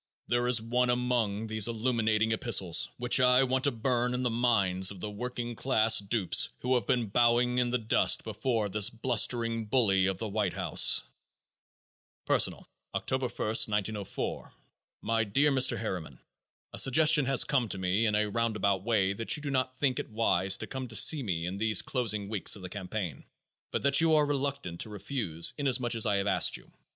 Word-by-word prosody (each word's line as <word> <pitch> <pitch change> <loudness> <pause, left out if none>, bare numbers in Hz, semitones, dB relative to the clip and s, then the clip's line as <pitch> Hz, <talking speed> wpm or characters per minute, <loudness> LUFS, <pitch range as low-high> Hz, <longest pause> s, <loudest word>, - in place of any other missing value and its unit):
There 120 0 0
is 125 -1 +3
one 120 +3 -1
among 120 -4 -1
these 110 -1 +1
illuminating 110 -2 0
epistles 100 -6 +2
which 125 0 +1
I 125 +1 +4
want 130 +1 0
to 145 - +2
burn 125 +1 -1
in 125 - -3
the 125 - -1
minds 100 -6 +1
of 100 - -6
the 105 +3 -5
working 120 +2 -6
class 110 -2 +2
dupes 100 -1 +2
who 125 +1 -1
have 125 - -1
been 120 -2 0
bowing 120 +2 +2
in 125 -1 0
the 125 - 0
dust 110 -2 +2
before 115 -5 -2
this 105 0 +2
blustering 115 -1 0
bully 100 -5 +2
of 95 - -2
the 110 - -5
White 105 -3 -2
House: - - +3 1.2
"Personal. - - +1 0.3
"October 130 -1 -2
1, - - -6
1904. 105 -2 -1 0.5
My 115 0 0
Dear 135 +8 +1
Mr. 130 -3 +2
Harriman: 90 - -6 0.6
A - - -2
suggestion 150 +2 +4
has 135 0 +4
come 130 -6 -1
to 95 - -5
me 95 +4 0
in 105 - 0
a 105 0 0
round 115 +1 -2
about 100 -2 0
way 100 -4 0
that 115 +3 -1
you 150 - -10
do 140 - -3
not 130 -1 -2
think 130 -3 0
it - - -6
wise 95 -4 +1
to - - -6
come 130 -1 -7
to 110 - -10
see 140 +8 +4
me 85 -8 -3
in 90 +2 -5
these 110 -1 +2
closing 110 -6 -2
weeks 105 -2 -1
of 100 - -12
the 90 - -7
campaign, 95 -6 -6 0.5
but - - -3
that 140 +2 +4
you 165 -1 +3
are 150 -1 +3
reluctant 140 -11 -3
to - - -5
refuse, 100 - -3
inasmuch 130 -4 0
as 115 -1 +2
I 105 - +1
have 100 0 -1
asked 100 - +2
you. - - -20
115 Hz, 190 wpm, -28 LUFS, 100-125 Hz, 1.2 s, I